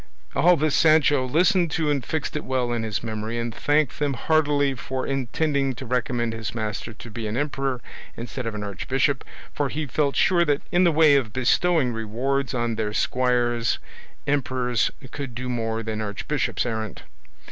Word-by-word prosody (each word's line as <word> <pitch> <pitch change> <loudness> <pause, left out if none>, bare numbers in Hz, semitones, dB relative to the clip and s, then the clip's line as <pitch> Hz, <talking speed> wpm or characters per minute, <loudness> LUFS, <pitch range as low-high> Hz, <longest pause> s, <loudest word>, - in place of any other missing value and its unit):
All 175 0 +5
this 155 0 +1
Sancho 150 -4 +4
listened 175 - +3
to 155 -3 +1
and 140 -3 0
fixed 160 -1 -3
it 150 - -2
well 130 -2 -1
in 120 - -1
his 110 -1 -3
memory, 110 0 -3
and 115 -1 -2
thanked 145 +1 +1
them 145 -2 0
heartily 145 -1 +2
for 130 +1 -4
intending 135 +1 0
to 125 - -7
recommend 120 -1 -1
his 115 +1 -5
master 110 0 -3
to 115 +1 -11
be 110 0 -4
an 105 +3 -3
emperor 135 -3 -1 0.4
instead 120 +1 -5
of 115 - -3
an 105 - -4
archbishop, 130 +7 0 0.3
for 145 -2 0
he 150 +3 -3
felt 140 +2 0
sure 175 -2 +4
that 145 -3 +1
in 180 +1 +4
the 170 - +5
way 155 -2 +6
of 120 -6 -1
bestowing 135 +1 +2
rewards 125 +5 -1
on 120 -2 -1
their 105 -2 -1
squires 120 -2 +1 0.5
emperors 130 -4 +1 0.2
could 135 -5 -6
do 125 +2 -4
more 115 -2 -2
than 110 -1 -3
archbishops 105 +2 -2
errant. 110 -4 -4
130 Hz, 175 wpm, -24 LUFS, 115-145 Hz, 0.5 s, way